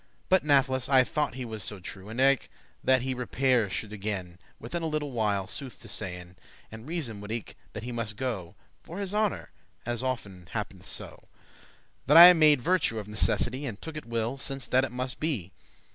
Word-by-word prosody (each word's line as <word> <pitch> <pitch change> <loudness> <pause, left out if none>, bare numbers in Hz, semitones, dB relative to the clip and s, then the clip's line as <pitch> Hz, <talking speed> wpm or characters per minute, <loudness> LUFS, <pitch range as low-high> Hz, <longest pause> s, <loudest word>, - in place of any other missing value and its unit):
But 190 0 +4
natheless, 130 -3 +2
I 130 -2 +6
thought 145 -1 -1
he 130 -1 -5
was 110 -3 -5
so 105 - -1
true, 95 +2 -9
And 115 +3 -6
eke 135 -1 +3 0.3
that 130 -1 +4
he 130 0 -1
repaire 125 -2 +1
should 105 +3 -5
again 95 -4 -4 0.2
Within 125 +9 -4
a 165 - -1
little 150 -2 -2
while, 105 -5 0
sooth 130 +3 -6
to - - -10
sayn, 90 -2 -5 0.3
And 110 +3 -10
reason 140 -11 -4
would 105 +1 -7
eke 115 -3 -5 0.2
that 105 - -6
he 125 - -5
muste 115 -3 -3
go 105 -10 -4 0.3
For 170 - -9
his 200 -1 -3
honour, 210 -1 0 0.3
as 120 0 -2
often 100 -9 -4
happ'neth - - -5
so, - - -6 0.9
That 150 +4 +7
I 175 +1 +12
made 155 -5 +5
virtue 175 -7 +1
of 105 -2 -5
necessity, 120 +5 0
And 110 -4 -6
took 160 -1 -8
it 155 - -7
well, 115 +2 -2
since 135 -1 -3
that 130 +1 +4
it 135 - -2
muste 125 +1 -4
be. 125 - -2
125 Hz, 195 wpm, -28 LUFS, 105-140 Hz, 0.9 s, I